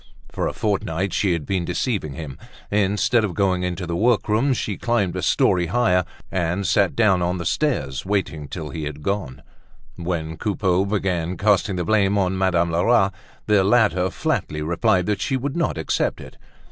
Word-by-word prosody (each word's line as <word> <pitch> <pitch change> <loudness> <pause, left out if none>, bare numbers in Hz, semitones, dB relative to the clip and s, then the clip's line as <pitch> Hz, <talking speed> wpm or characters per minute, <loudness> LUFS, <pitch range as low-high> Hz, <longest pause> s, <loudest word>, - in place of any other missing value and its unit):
For - - -2
a - - -3
fortnight 95 -3 -1
she 95 -4 +1
had 80 -3 -3
been 95 0 -1
deceiving 95 - -2
him; 70 -2 -8 0.3
instead 105 +3 +2
of 95 -5 -2
going 95 -3 +1
into 90 0 -3
the 85 0 -3
workroom, 115 +4 +2
she 105 -3 -3
climbed 115 -7 0
a - - -2
story 90 -2 +2
higher, 90 -4 +2 0.3
and 90 +2 -1
sat 100 0 +2
down 105 -6 +3
on 90 +1 0
the 90 - -5
stairs, 125 - -1
waiting 85 -7 -2
till 80 -3 -6
he 80 +1 -4
had 75 0 -7
gone 80 -10 -3 0.5
off. 85 - -7
When 80 -2 -3
Coupeau 95 -3 0
began 95 -4 -1
casting 100 -1 +2
the 90 -1 -2
blame 100 -1 +2
on 95 -1 +1
Madame 90 -3 +1
Lerat, 95 +3 +3 0.3
the 105 -2 +3
latter 100 -4 +3
flatly 105 - -2
replied 90 +3 +1
that 105 0 -1
she 130 +7 0
would 135 +2 -3
not 170 - 0
accept 80 - -1
it. - - -11
95 Hz, 180 wpm, -22 LUFS, 85-105 Hz, 0.5 s, down